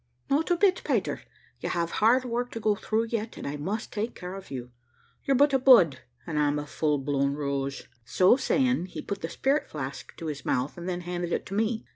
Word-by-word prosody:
"Not 300 Hz, +5 st, +2 dB
a 350 Hz, -, +3 dB
bit, 375 Hz, 0 st, +3 dB
Peter: -, -, 0 dB, 0.4 s
you -, -, -3 dB
have 170 Hz, -1 st, -1 dB
hard 250 Hz, +4 st, +5 dB
work 245 Hz, 0 st, -2 dB
to 230 Hz, -, -4 dB
go 215 Hz, -1 st, +2 dB
through 220 Hz, +2 st, -1 dB
yet, 225 Hz, -1 st, -3 dB
and -, -, -7 dB
I 140 Hz, -, -3 dB
must 195 Hz, +10 st, -4 dB
take 215 Hz, +3 st, -3 dB
care 180 Hz, +1 st, -7 dB
of 195 Hz, 0 st, -9 dB
you. 125 Hz, -2 st, -6 dB, 0.5 s
You're 275 Hz, -, +3 dB
but 285 Hz, +1 st, +4 dB
a 270 Hz, -, +4 dB
bud, 205 Hz, -, +6 dB, 0.3 s
and 155 Hz, -2 st, -2 dB
I'm 145 Hz, 0 st, +2 dB
a 150 Hz, -, -3 dB
full 150 Hz, 0 st, 0 dB
blown 140 Hz, 0 st, 0 dB
rose." 140 Hz, -1 st, -2 dB, 0.2 s
So 130 Hz, -, +4 dB
saying, 255 Hz, -6 st, +1 dB
he -, -, -7 dB
put 200 Hz, -1 st, -4 dB
the 165 Hz, -, -3 dB
spirit 275 Hz, -, 0 dB
flask 135 Hz, -2 st, -6 dB
to 165 Hz, -, -7 dB
his 150 Hz, -3 st, -4 dB
mouth, 125 Hz, +3 st, -1 dB
and 175 Hz, +1 st, -5 dB
then 180 Hz, -1 st, -2 dB
handed 175 Hz, 0 st, -3 dB
it -, -, -1 dB
to -, -, -8 dB
me. 220 Hz, +2 st, 0 dB
180 Hz, 225 wpm, -27 LUFS, 145-235 Hz, 0.5 s, bud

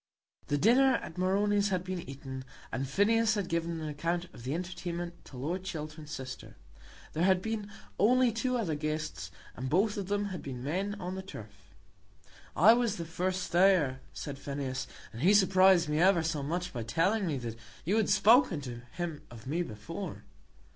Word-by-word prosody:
The 145 Hz, -, +1 dB
dinner 255 Hz, -, +5 dB
at 180 Hz, -5 st, -5 dB
Moroni's 200 Hz, +2 st, +2 dB
had 185 Hz, -2 st, 0 dB
been 185 Hz, -1 st, -4 dB
eaten, 135 Hz, -1 st, -7 dB, 0.3 s
and 130 Hz, +3 st, -2 dB
Phineas 220 Hz, +6 st, +3 dB
had 200 Hz, -4 st, -1 dB
given 165 Hz, 0 st, -1 dB
an 155 Hz, -, -4 dB
account 170 Hz, +4 st, -1 dB
of -, -, -11 dB
the 130 Hz, +5 st, -2 dB
entertainment 175 Hz, -1 st, -5 dB
to 130 Hz, -, -11 dB
Lord 170 Hz, +8 st, -3 dB
Chiltern's 155 Hz, -4 st, -6 dB
sister. 130 Hz, -3 st, -7 dB, 0.6 s
There 155 Hz, -, -2 dB
had 185 Hz, 0 st, +4 dB
been 210 Hz, 0 st, -4 dB, 0.3 s
only 250 Hz, +3 st, +5 dB
two 250 Hz, +3 st, 0 dB
other 195 Hz, -9 st, -1 dB
guests, 155 Hz, -, -3 dB, 0.3 s
and 130 Hz, +2 st, -4 dB
both 200 Hz, +8 st, +2 dB
of 195 Hz, -2 st, -3 dB
them 205 Hz, +1 st, 0 dB
had 180 Hz, -, -5 dB
been 125 Hz, -3 st, -6 dB
men 190 Hz, +8 st, -1 dB
on 180 Hz, -1 st, -4 dB
the 190 Hz, -, -4 dB
turf. 105 Hz, -, -12 dB, 0.8 s
"I 210 Hz, +8 st, +8 dB
was 235 Hz, -3 st, +1 dB
the 170 Hz, -, -5 dB
first 180 Hz, +2 st, -2 dB
there," 170 Hz, -7 st, +4 dB
said 140 Hz, -2 st, -6 dB
Phineas, 140 Hz, -2 st, -4 dB, 0.3 s
"and 115 Hz, -, -7 dB
he 190 Hz, +7 st, +5 dB
surprised 190 Hz, -3 st, +5 dB
me 150 Hz, +1 st, 0 dB
ever 180 Hz, -1 st, +5 dB
so 160 Hz, -2 st, -1 dB
much 175 Hz, +5 st, -3 dB
by 120 Hz, -, -3 dB
telling 185 Hz, -, +1 dB
me 150 Hz, -4 st, -1 dB
that 120 Hz, -3 st, -5 dB, 0.3 s
you 200 Hz, +7 st, +2 dB
had 220 Hz, -, +2 dB
spoken 205 Hz, -, +5 dB
to 120 Hz, -3 st, -7 dB
him 170 Hz, -3 st, -4 dB
of 115 Hz, -2 st, -12 dB
me 155 Hz, +6 st, -1 dB
before." 110 Hz, -9 st, -6 dB
175 Hz, 180 wpm, -31 LUFS, 145-195 Hz, 0.8 s, I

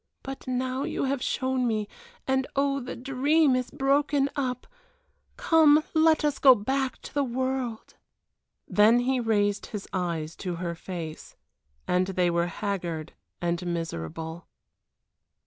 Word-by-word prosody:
But 270 Hz, -1 st, -7 dB
now 255 Hz, +1 st, -1 dB
you -, -, -2 dB
have 270 Hz, -1 st, -1 dB
shown 260 Hz, -1 st, 0 dB
me 215 Hz, -2 st, -1 dB, 0.4 s
and 265 Hz, 0 st, +1 dB
oh, 275 Hz, 0 st, +1 dB
the 255 Hz, -1 st, -6 dB
dream 275 Hz, +3 st, +2 dB
is 255 Hz, -1 st, -1 dB
broken 280 Hz, 0 st, +1 dB
up. 250 Hz, -3 st, -2 dB, 0.7 s
Come, 310 Hz, -2 st, +5 dB
let 315 Hz, -1 st, +4 dB
us 295 Hz, -2 st, 0 dB
go 265 Hz, -2 st, +8 dB
back 265 Hz, +5 st, -1 dB
to -, -, -10 dB
the 285 Hz, -, +1 dB
world." 255 Hz, -2 st, -3 dB, 0.7 s
Then 220 Hz, +4 st, +5 dB
he 255 Hz, +1 st, +1 dB
raised 205 Hz, -3 st, +1 dB
his 210 Hz, -2 st, -6 dB
eyes 170 Hz, -4 st, -2 dB
to 180 Hz, -2 st, -4 dB
her 170 Hz, 0 st, -3 dB
face, 165 Hz, -2 st, -7 dB, 0.5 s
and 180 Hz, +1 st, +2 dB
they 180 Hz, -2 st, +1 dB
were 170 Hz, 0 st, +1 dB
haggard 175 Hz, -5 st, -4 dB, 0.3 s
and 175 Hz, +1 st, 0 dB
miserable. 165 Hz, -, -5 dB
250 Hz, 135 wpm, -27 LUFS, 180-270 Hz, 0.7 s, go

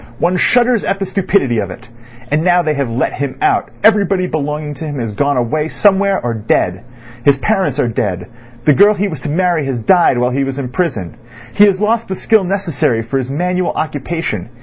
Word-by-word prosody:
One 175 Hz, +6 st, +1 dB
shudders 240 Hz, +4 st, +2 dB
at 195 Hz, -, -1 dB
the 195 Hz, -, -3 dB
stupidity 185 Hz, -, 0 dB
of 100 Hz, -3 st, -3 dB
it. 90 Hz, -, -11 dB, 0.4 s
And 155 Hz, +2 st, +1 dB
now 180 Hz, 0 st, +3 dB
they 155 Hz, -1 st, 0 dB
have 140 Hz, -4 st, -2 dB
let 115 Hz, +2 st, -1 dB
him 140 Hz, -2 st, -4 dB
out 385 Hz, -1 st, +1 dB
everybody 200 Hz, -3 st, +3 dB
belonging 150 Hz, -2 st, -3 dB
to 160 Hz, -, -7 dB
him 145 Hz, -3 st, -5 dB
is 115 Hz, -3 st, -4 dB
gone 140 Hz, +5 st, 0 dB
away 150 Hz, +6 st, 0 dB
somewhere 200 Hz, +2 st, +2 dB
or 120 Hz, -1 st, -2 dB
dead. 105 Hz, -4 st, -1 dB, 0.4 s
His 140 Hz, +1 st, +4 dB
parents 190 Hz, -, 0 dB
are 125 Hz, -, +2 dB
dead; 105 Hz, -6 st, -2 dB, 0.4 s
the 150 Hz, -, +5 dB
girl 205 Hz, +6 st, +5 dB
he 205 Hz, +1 st, -1 dB
was 160 Hz, -8 st, -6 dB
to 145 Hz, -, -5 dB
marry 175 Hz, 0 st, +1 dB
has 130 Hz, -2 st, -2 dB
died 165 Hz, -, +3 dB
while 125 Hz, +1 st, +1 dB
he 135 Hz, +2 st, 0 dB
was 135 Hz, 0 st, -4 dB
in 135 Hz, -3 st, -4 dB
prison; 125 Hz, -, -3 dB, 0.4 s
he 205 Hz, -, +6 dB
has 195 Hz, -2 st, +2 dB
lost 225 Hz, +2 st, 0 dB
the 190 Hz, -, -3 dB
skill 215 Hz, +1 st, +2 dB
necessary 175 Hz, -, -1 dB
for 135 Hz, +4 st, -2 dB
his 130 Hz, -1 st, -4 dB
manual 180 Hz, +5 st, -1 dB
occupation. 150 Hz, -, -3 dB
155 Hz, 210 wpm, -15 LUFS, 130-190 Hz, 0.4 s, he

